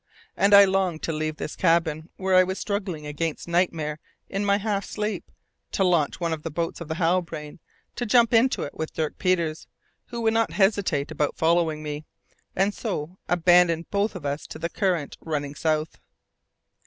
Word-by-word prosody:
And 200 +1 +5
I 200 0 +10
longed 190 -4 0
to 165 - -1
leave 155 0 -2
this - - -5
cabin 165 -2 +1
where 190 0 0
I 185 0 +7
was 190 +1 -3
struggling 190 -7 -3
against 150 +2 -3
nightmare 165 -3 0 0.3
in 195 +1 -2
my 200 0 +3
half 205 -1 -1
sleep, 210 0 -4 0.4
to 195 - +2
launch 170 -5 +2
one 170 -2 -1
of 155 - -4
the 165 - -4
boats 165 +2 -3
of 170 - -6
the 160 - -3
Halbrane, 165 -3 -1 0.4
to 240 - -2
jump 235 +1 +4
into 235 +3 +3
it 145 - -6
with 160 - -5
Dirk 155 -2 -2
Peters, 170 -4 0 0.4
who 235 - -6
would 225 -1 +2
not 225 0 +1
hesitate 195 -8 +1
about 150 - -1
following 160 -2 +2
me, 150 0 -5 0.5
and 195 +2 +2
so 185 -6 -4
abandon 175 -1 +4
both 205 +1 0
of 170 -5 -7
us 140 +1 -3
to - - -8
the 170 +1 -3
current 180 -8 -1
running 145 -3 -3
south. 155 +1 -1
170 Hz, 180 wpm, -25 LUFS, 155-195 Hz, 0.5 s, I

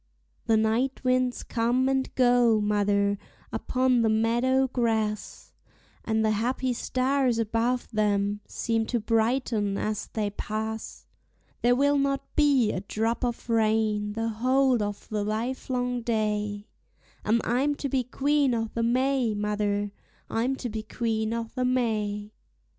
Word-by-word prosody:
The 225 -1 +4
night 225 +6 0
winds 255 -1 +1
come 245 +2 +1
and 265 0 0
go, 245 -3 +4
mother, 205 -1 +1 0.3
upon 255 -1 +1
the 225 - +3
meadow 240 +4 +2
grass, 220 -4 -2 0.5
And 220 -1 +1
the 215 - +3
happy 245 +4 0
stars 255 0 0
above 230 +2 0
them 205 -1 +1
seem 225 -1 -1
to 240 - 0
brighten 225 -2 0
as 215 -1 -2
they 210 -2 -2
pass; 220 +2 -5 0.6
There 245 +1 +4
will 285 +2 +3
not 275 0 -2
be 280 -7 +4
a 185 - -3
drop 225 +4 -2
of 240 -1 -3
rain 215 -2 +1
the 225 +1 -2
whole 255 +2 +2
of 205 0 -4
the 210 -1 -1
livelong 245 +3 -2
day; 210 -2 -1 0.6
And 220 +2 +2
I'm 270 +5 +1
to 280 - -3
be 260 -1 0
Queen 275 +1 +1
o'the 225 0 -2
May, 250 -1 +1
mother, 205 0 -1 0.4
I'm 245 +4 0
to 250 -2 -5
be 220 0 -4
Queen 220 0 -2
o'the 230 +2 -3
May. 215 -5 -1
230 Hz, 135 wpm, -27 LUFS, 215-255 Hz, 0.6 s, The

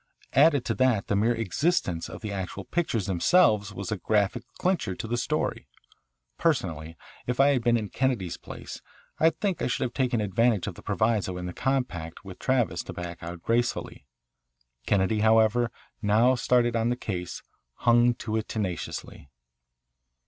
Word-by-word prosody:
Added 145 -1 +5
to - - 0
that 125 -6 +2
the 100 - +2
mere 115 +4 +2
existence 115 - 0
of 90 - -9
the 105 -2 -4
actual 95 -2 -5
pictures 120 - -1
themselves 105 - +3
was 100 0 -6
a 105 - -1
graphic 105 +4 +1 0.2
clincher 175 - 0
to 110 - -5
the 120 - -1
story. 140 +6 -2 0.7
Personally, 85 - -1 0.3
if 125 +1 -2
I 140 +1 +6
had 130 -4 +1
been 120 0 +4
in 105 -3 -4
Kennedy's 115 -8 -1
place - - -9 0.4
I 160 - +6
think 190 +2 -2
I - - +1
should 125 - -1
have 125 - -3
taken 125 -3 +1
advantage 105 +1 +2
of - - -4
the - - -13
proviso 110 -5 0
in 90 - -5
the 90 - -5
compact 100 -11 -2
with 95 -2 -10
Travis 120 -10 +1
to - - -7
back 85 -1 -7
out 85 0 -7
gracefully. 115 - -1 0.8
Kennedy, 100 +2 +2
however, 110 +2 +4 0.3
now 110 +4 +4
started 120 -1 +2
on 115 +1 +1
the 120 - +1
case, 90 -8 -5 0.3
hung 120 0 +4
to 110 -1 -3
it 110 - -3
tenaciously. 90 -8 -4
110 Hz, 165 wpm, -27 LUFS, 95-125 Hz, 0.8 s, I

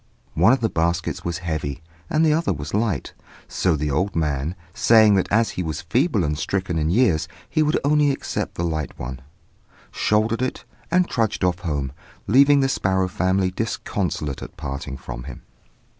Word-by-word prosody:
One 90 +8 +5
of 130 - +2
the 115 - +2
baskets 85 0 -1
was 85 0 -2
heavy, 80 -2 -3 0.3
and 155 +1 +3
the 155 - +4
other 165 -4 +1
was 75 -1 -7
light; 105 -7 -1 0.3
so 90 -3 +1
the 75 0 -1
old 95 +8 0
man, 75 0 -1 0.2
saying 110 -1 +5
that 95 -2 +1
as 110 +2 +3
he - - -4
was 80 -1 -4
feeble 120 - +1
and 75 -1 0
stricken 95 +1 -2
in 75 0 0
years 95 -5 +2 0.2
he 155 - 0
would 150 0 +2
only 150 0 +3
accept 135 - -3
the 85 - -2
light 80 -3 -3
one, 65 +1 -6 0.7
shouldered 110 +2 +1
it, 130 - -3 0.2
and 180 +1 +3
trudged 110 -5 -1
off 90 0 +1
home, 75 -7 -2 0.3
leaving 140 +5 +5
the 135 - +3
sparrow 95 -7 +1
family 95 +1 +1
disconsolate 90 -8 -3
at - - -9
parting 70 0 -5
from - - -8
him. - - -9
95 Hz, 175 wpm, -23 LUFS, 80-115 Hz, 0.7 s, One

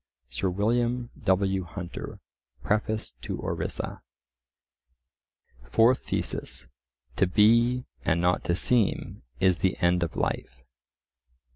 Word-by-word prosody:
Sir 70 +9 -1
William 120 +5 0
W. 95 -1 +2
Hunter, 85 0 -7 0.4
Preface 110 +1 -1
to - - -4
Orissa.) - - -3 1.6
Fourth 115 - +3
Thesis:— - - -3 0.5
To 95 - +4
be 115 +6 +4 0.2
and 80 - +2
not 90 +1 +2
to 85 - +1
seem 115 +2 +1 0.2
is 95 -2 +3
the 95 - +1
end 90 0 +2
of 85 - -2
life. 65 - -3
95 Hz, 105 wpm, -27 LUFS, 90-115 Hz, 1.6 s, To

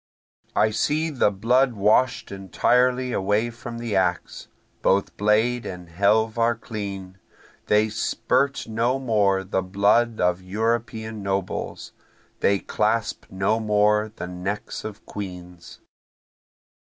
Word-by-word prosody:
I 110 - +3
see 155 +8 0
the 130 -7 +2
blood 120 +6 +2
wash'd 110 +4 +2
entirely 125 +6 +1
away 105 +5 +1
from 115 0 -8
the 115 -3 -3
axe, 90 -2 -1 0.3
Both 100 +1 +1
blade 110 +4 +2
and 90 -2 -8
helve 110 +6 +2
are 115 +1 +3
clean, 100 -5 -7 0.5
They 105 +1 +4
spirt 140 +5 0
no 115 +4 0
more 105 -7 +1
the 95 0 -1
blood 105 +5 +2
of 90 0 +1
European 110 +2 -2
nobles, 95 -1 -3 0.5
they 100 - +3
clasp 110 +2 -1
no 95 +4 0
more 105 0 +2
the - - -5
necks 90 +3 -5
of 110 -2 -8
queens. 90 -3 -9
105 Hz, 115 wpm, -24 LUFS, 95-115 Hz, 0.5 s, They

